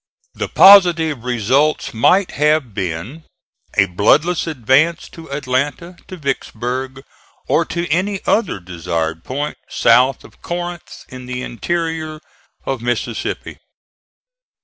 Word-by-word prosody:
The -, -, -4 dB
positive 170 Hz, -, +6 dB
results 125 Hz, +5 st, +1 dB
might 180 Hz, -, +3 dB
have 150 Hz, -5 st, +1 dB
been: 95 Hz, -, -5 dB, 0.5 s
a 100 Hz, -, +6 dB
bloodless 145 Hz, -, +2 dB
advance 150 Hz, +4 st, +1 dB
to 160 Hz, -3 st, -13 dB
Atlanta, 140 Hz, +5 st, -2 dB
to 185 Hz, -, -9 dB
Vicksburg, 130 Hz, -2 st, -4 dB, 0.4 s
or -, -, +2 dB
to 170 Hz, 0 st, -3 dB
any 190 Hz, +5 st, 0 dB
other 205 Hz, -, +1 dB
desired 85 Hz, -2 st, -4 dB
point 145 Hz, +3 st, -4 dB
south 125 Hz, +3 st, +3 dB
of -, -, -18 dB
Corinth 175 Hz, 0 st, -6 dB
in 125 Hz, -1 st, -10 dB
the 125 Hz, 0 st, -4 dB
interior 160 Hz, +3 st, -3 dB, 0.5 s
of 135 Hz, -3 st, -3 dB
Mississippi. 120 Hz, -1 st, -3 dB
140 Hz, 110 wpm, -18 LUFS, 120-165 Hz, 0.5 s, positive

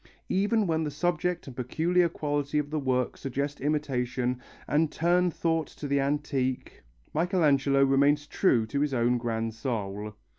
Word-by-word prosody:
Even 205 Hz, +3 st, +2 dB
when 160 Hz, -2 st, 0 dB
the 150 Hz, -, -2 dB
subject 175 Hz, +3 st, -1 dB
and 135 Hz, -, -9 dB
peculiar 170 Hz, +8 st, +1 dB
quality 145 Hz, -2 st, -2 dB
of 150 Hz, 0 st, -1 dB
the 155 Hz, -, 0 dB
work 130 Hz, -2 st, 0 dB
suggest 140 Hz, +2 st, -3 dB
imitation 125 Hz, -4 st, -1 dB, 0.3 s
and 155 Hz, +1 st, +2 dB
turn 175 Hz, +2 st, +2 dB
thought 165 Hz, -1 st, -1 dB
to 145 Hz, -, -8 dB
the 140 Hz, 0 st, +1 dB
antique, 135 Hz, -2 st, -2 dB, 0.3 s
Michelangelo 145 Hz, -5 st, +3 dB
remains 140 Hz, +2 st, +3 dB
true 130 Hz, -, +2 dB
to 140 Hz, +6 st, -3 dB
his 145 Hz, -2 st, 0 dB
own 120 Hz, 0 st, +2 dB
grand 115 Hz, -1 st, -2 dB
soul. 105 Hz, -3 st, -4 dB
145 Hz, 150 wpm, -28 LUFS, 125-160 Hz, 0.3 s, Michelangelo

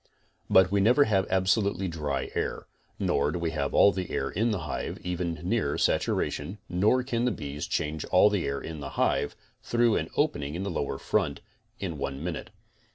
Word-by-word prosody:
But 95 Hz, 0 st, +6 dB
we 100 Hz, 0 st, +3 dB
never 125 Hz, +8 st, +5 dB
have 95 Hz, -6 st, +1 dB
absolutely 95 Hz, 0 st, +1 dB
dry 75 Hz, -5 st, -3 dB
air, -, -, -2 dB, 0.3 s
nor 70 Hz, +1 st, +1 dB
do 90 Hz, -, -3 dB
we 85 Hz, -2 st, -1 dB
have 70 Hz, -3 st, -2 dB
all 100 Hz, -, +7 dB
the 95 Hz, -3 st, -4 dB
air -, -, -2 dB
in 110 Hz, +5 st, +1 dB
the 105 Hz, -6 st, -1 dB
hive 75 Hz, -3 st, -4 dB
even 90 Hz, -1 st, -2 dB
near -, -, 0 dB
saturation, 75 Hz, +8 st, 0 dB
nor 105 Hz, +8 st, +2 dB
can 120 Hz, -2 st, -1 dB
the 125 Hz, -, +2 dB
bees 75 Hz, -6 st, -5 dB
change 75 Hz, 0 st, -2 dB
all 90 Hz, -, +5 dB
the 100 Hz, -7 st, 0 dB
air 70 Hz, 0 st, -2 dB
in 80 Hz, -1 st, -7 dB
the 70 Hz, -1 st, -5 dB
hive, -, -, +1 dB, 0.3 s
through 120 Hz, -1 st, +2 dB
an -, -, -2 dB
opening 70 Hz, +2 st, 0 dB
in 90 Hz, -, -3 dB
the 100 Hz, -, -3 dB
lower 70 Hz, -4 st, -2 dB
front, -, -, -1 dB, 0.4 s
in 85 Hz, -7 st, -4 dB
one 70 Hz, +1 st, -4 dB
min 90 Hz, -1 st, -2 dB
ute. -, -, -7 dB
90 Hz, 195 wpm, -28 LUFS, 75-100 Hz, 0.4 s, all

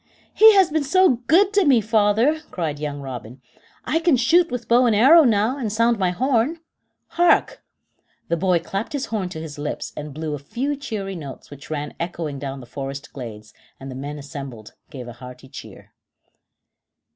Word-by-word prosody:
"He 440 Hz, 0 st, +7 dB
has 380 Hz, -5 st, +4 dB
been 315 Hz, -1 st, 0 dB
so 325 Hz, -2 st, +3 dB
good 390 Hz, +5 st, +4 dB
to 405 Hz, -1 st, +4 dB
me, 275 Hz, -7 st, +5 dB
father," 220 Hz, +7 st, +2 dB
cried 155 Hz, -5 st, -4 dB
young 145 Hz, -1 st, -4 dB
Robin. 125 Hz, -2 st, -8 dB, 0.5 s
"I 325 Hz, -, +1 dB
can 330 Hz, -5 st, +3 dB
shoot 335 Hz, +9 st, +3 dB
with 245 Hz, -1 st, -5 dB
bow 245 Hz, +1 st, +4 dB
and 225 Hz, -, +3 dB
arrow 290 Hz, +10 st, +7 dB
now, 225 Hz, +4 st, +1 dB
and 225 Hz, -5 st, -2 dB
sound 230 Hz, +1 st, +2 dB
my 185 Hz, -2 st, +2 dB
horn. 260 Hz, -, 0 dB, 0.5 s
Hark!" 350 Hz, 0 st, +2 dB, 0.7 s
The 170 Hz, -, 0 dB
boy 180 Hz, +1 st, +2 dB
clapped 195 Hz, -, -4 dB
his 280 Hz, -2 st, -2 dB
horn 195 Hz, -4 st, -1 dB
to 160 Hz, -, -7 dB
his 155 Hz, -2 st, -8 dB
lips 150 Hz, +1 st, -5 dB
and 150 Hz, 0 st, -7 dB
blew 155 Hz, +1 st, -5 dB
a 145 Hz, -, -4 dB
few 255 Hz, -, -3 dB
cheery 215 Hz, -8 st, -5 dB
notes 145 Hz, -5 st, -9 dB
which 145 Hz, -1 st, -12 dB
ran 150 Hz, -1 st, -4 dB
echoing 165 Hz, -4 st, -4 dB
down 135 Hz, -1 st, -6 dB
the -, -, -11 dB
forest 135 Hz, +3 st, -7 dB
glades, 110 Hz, -5 st, -9 dB, 0.3 s
and 135 Hz, 0 st, -8 dB
the -, -, -8 dB
men 145 Hz, +3 st, -6 dB
assembled 140 Hz, -6 st, -9 dB, 0.2 s
gave 130 Hz, -5 st, -9 dB
a 120 Hz, -, -8 dB
hearty 125 Hz, +2 st, -12 dB
cheer. 135 Hz, -, -12 dB
185 Hz, 185 wpm, -22 LUFS, -, 0.7 s, He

